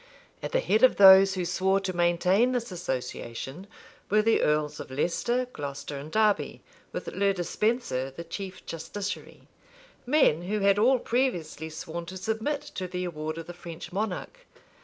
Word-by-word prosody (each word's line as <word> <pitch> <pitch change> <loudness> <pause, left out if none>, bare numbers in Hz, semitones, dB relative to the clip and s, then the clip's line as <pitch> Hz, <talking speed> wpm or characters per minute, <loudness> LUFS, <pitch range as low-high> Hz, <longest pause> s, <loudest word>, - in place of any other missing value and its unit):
At - - -4
the - - +2
head 220 - +2
of 255 - +6
those 195 0 +8
who 180 -1 -2
swore 190 +3 +1
to 185 -2 -3
maintain 180 +7 +3
this 240 -3 -2
association, 135 - -5 0.4
were 215 +1 +4
the 225 +1 +3
earls 150 0 +1
of - - -7
Leicester, 180 - 0
Glocester, 145 0 -6
and 150 +3 -9
Derby, 215 0 +1 0.3
with - - -5
Le 200 -1 +1
Despenser, 180 - -1
the 135 +5 -8
chief 185 +2 -7
justiciary; 195 +5 -6 0.6
men 255 - +4
who 205 +4 -2
had 200 +1 +4
all 255 +5 +5
previously 200 - -1
sworn 170 +1 -6
to 185 +2 -7
submit 220 +9 -2
to 185 - -6
the 180 0 -4
award 155 -2 -4
of 165 - -6
the 175 - -8
French 170 -2 -9
monarch. 220 - -4
185 Hz, 160 wpm, -27 LUFS, 165-215 Hz, 0.6 s, those